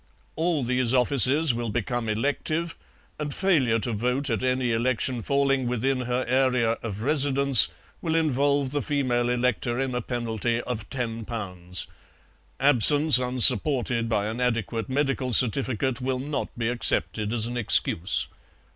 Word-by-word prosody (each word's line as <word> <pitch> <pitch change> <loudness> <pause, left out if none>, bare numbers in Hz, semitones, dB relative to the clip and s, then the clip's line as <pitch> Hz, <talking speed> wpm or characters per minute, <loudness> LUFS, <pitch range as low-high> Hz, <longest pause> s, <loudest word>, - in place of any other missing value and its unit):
All 160 -3 -1
these 125 0 0
offices 135 +3 +3
will 115 0 -4
become 120 +1 -3
elective, 145 +8 -3 0.4
and 150 -1 -4
failure 140 -11 +1
to 120 - -2
vote 125 +5 -1
at 115 - -2
any 130 -1 -1
election 120 +1 -1
falling 135 0 0
within 130 +2 -1
her 125 +1 -3
area 125 -2 +1
of 110 -2 -6
residence 140 -3 +3 0.3
will 160 -1 -2
involve 140 -3 0
the 145 0 -2
female 130 -5 -1
elector 125 0 -1
in 135 -1 -3
a 125 - -2
penalty 115 -1 -3
of 120 -4 -7
£10. 110 -8 -5 0.7
Absence, 145 +1 +6
unsupported 125 -1 +4
by 105 -3 -1
an 110 +3 -5
adequate 115 -3 -2
medical 135 -2 -2
certificate, 130 +1 0
will 130 0 -2
not 140 +2 -4
be 115 -1 -2
accepted 110 -3 -1
as 115 -2 -1
an 120 +1 -5
excuse. 95 -6 +4
125 Hz, 140 wpm, -24 LUFS, 115-135 Hz, 0.7 s, Absence